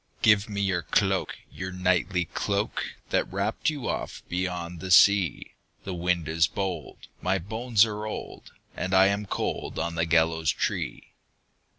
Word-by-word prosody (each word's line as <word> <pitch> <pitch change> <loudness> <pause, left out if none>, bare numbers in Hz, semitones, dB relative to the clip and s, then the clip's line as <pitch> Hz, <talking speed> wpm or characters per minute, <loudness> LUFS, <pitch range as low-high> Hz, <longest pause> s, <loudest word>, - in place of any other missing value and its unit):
"Give 105 -1 +5
me 100 -1 -2
your 95 -3 +1
cloak, - - +1 0.2
your 95 0 -6
knightly 90 0 +1
cloak, 100 +5 -2 0.3
That - - +1
wrapped - - 0
you 145 -4 -4
oft - - -4
beyond 90 -1 -3
the 95 - -6
sea; 95 -2 +5 0.3
The 95 - -5
wind 85 -2 0
is 80 +1 +3
bold, 95 -6 -5 0.2
my 95 +1 +1
bones 110 +4 +2
are 105 -1 -4
old, 110 - -7 0.2
And 95 +1 -1
I 95 +1 +6
am 100 +1 -2
cold - - -3
on 85 - -2
the 85 0 0
gallows 80 -1 +3
tree." - - -3
95 Hz, 155 wpm, -27 LUFS, 85-100 Hz, 0.3 s, I